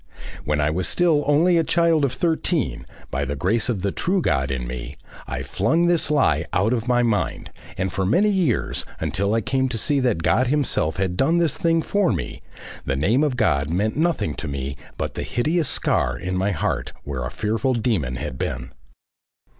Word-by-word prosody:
When 75 Hz, 0 st, 0 dB
I 75 Hz, +1 st, +2 dB
was 90 Hz, +3 st, -1 dB
still 165 Hz, -4 st, +2 dB
only 165 Hz, +4 st, +4 dB
a 165 Hz, -, +3 dB
child 165 Hz, -2 st, +2 dB
of 140 Hz, -, +2 dB
thirteen, 160 Hz, -, -1 dB, 0.2 s
by 70 Hz, -, -1 dB
the 70 Hz, +1 st, -3 dB
grace 105 Hz, -, +1 dB
of 100 Hz, -6 st, -1 dB
the 100 Hz, -, +1 dB
true 190 Hz, -, 0 dB
God 65 Hz, -, +1 dB
in 65 Hz, -2 st, -2 dB
me, 60 Hz, +3 st, -6 dB, 0.3 s
I 65 Hz, -, -4 dB
flung 160 Hz, -, +1 dB
this 175 Hz, -4 st, +2 dB
Lie 85 Hz, -, +2 dB
out 100 Hz, +6 st, +2 dB
of 120 Hz, -1 st, -2 dB
my 120 Hz, -1 st, +3 dB
mind, 115 Hz, -3 st, -1 dB, 0.3 s
and 95 Hz, 0 st, -1 dB
for 95 Hz, -, -1 dB
many 180 Hz, -, +3 dB
years, 180 Hz, -, 0 dB, 0.2 s
until 100 Hz, +3 st, 0 dB
I 115 Hz, -, +2 dB
came 130 Hz, +4 st, 0 dB
to 120 Hz, -, -3 dB
see 140 Hz, +6 st, +1 dB
that 120 Hz, -10 st, 0 dB
God 125 Hz, +9 st, +3 dB
himself 130 Hz, -, 0 dB
had 95 Hz, -2 st, -1 dB
done 160 Hz, -, +3 dB
this 165 Hz, -5 st, +1 dB
thing 165 Hz, -1 st, +1 dB
for 200 Hz, -9 st, +1 dB
me, 85 Hz, -8 st, -4 dB, 0.4 s
the 65 Hz, -, -1 dB
name 100 Hz, -, +2 dB
of 140 Hz, -5 st, 0 dB
God 75 Hz, -, +1 dB
meant 100 Hz, +6 st, 0 dB
nothing 155 Hz, -, 0 dB
to -, -, -5 dB
me 70 Hz, -1 st, -4 dB, 0.2 s
but -, -, -3 dB
the -, -, -4 dB
hideous 155 Hz, +7 st, 0 dB
scar 60 Hz, 0 st, 0 dB
in 90 Hz, +7 st, -3 dB
my 95 Hz, +2 st, +1 dB
heart 90 Hz, -7 st, -2 dB
where 70 Hz, -3 st, -4 dB
a 60 Hz, -, -3 dB
fearful 115 Hz, -, -1 dB
demon 100 Hz, -, 0 dB
had 65 Hz, +1 st, -5 dB
been. 60 Hz, +1 st, -3 dB
110 Hz, 200 wpm, -23 LUFS, -, 0.4 s, only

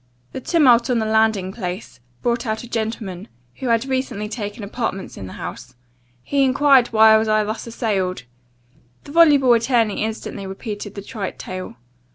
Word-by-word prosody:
"The 265 Hz, -, -6 dB
tumult 255 Hz, -6 st, +4 dB
on 250 Hz, -, +2 dB
the 220 Hz, -, 0 dB
landing 220 Hz, -3 st, +2 dB
place, 185 Hz, -, -6 dB, 0.2 s
brought 240 Hz, +1 st, 0 dB
out 220 Hz, +1 st, -2 dB
a -, -, -9 dB
gentleman, 220 Hz, -4 st, -4 dB, 0.3 s
who 260 Hz, -, -4 dB
had 230 Hz, +1 st, +2 dB
recently 260 Hz, -5 st, -2 dB
taken 210 Hz, 0 st, -6 dB
apartments 200 Hz, -2 st, -4 dB
in 95 Hz, -, -8 dB
the -, -, -9 dB
house; 120 Hz, +9 st, -8 dB, 0.5 s
he 280 Hz, -1 st, +1 dB
enquired 270 Hz, -1 st, +4 dB
why 220 Hz, -1 st, +6 dB
I -, -, +7 dB
was 220 Hz, -, -1 dB
thus 215 Hz, +1 st, 0 dB
assailed?* 200 Hz, -, -2 dB, 0.8 s
The -, -, -11 dB
voluble 290 Hz, -6 st, +6 dB
attorney 230 Hz, -3 st, +1 dB
instantly 215 Hz, -2 st, -5 dB
repeated 205 Hz, +1 st, -6 dB
the 200 Hz, -, -7 dB
trite 200 Hz, -2 st, -5 dB
tale. 185 Hz, -9 st, -7 dB
220 Hz, 165 wpm, -21 LUFS, 200-245 Hz, 0.8 s, I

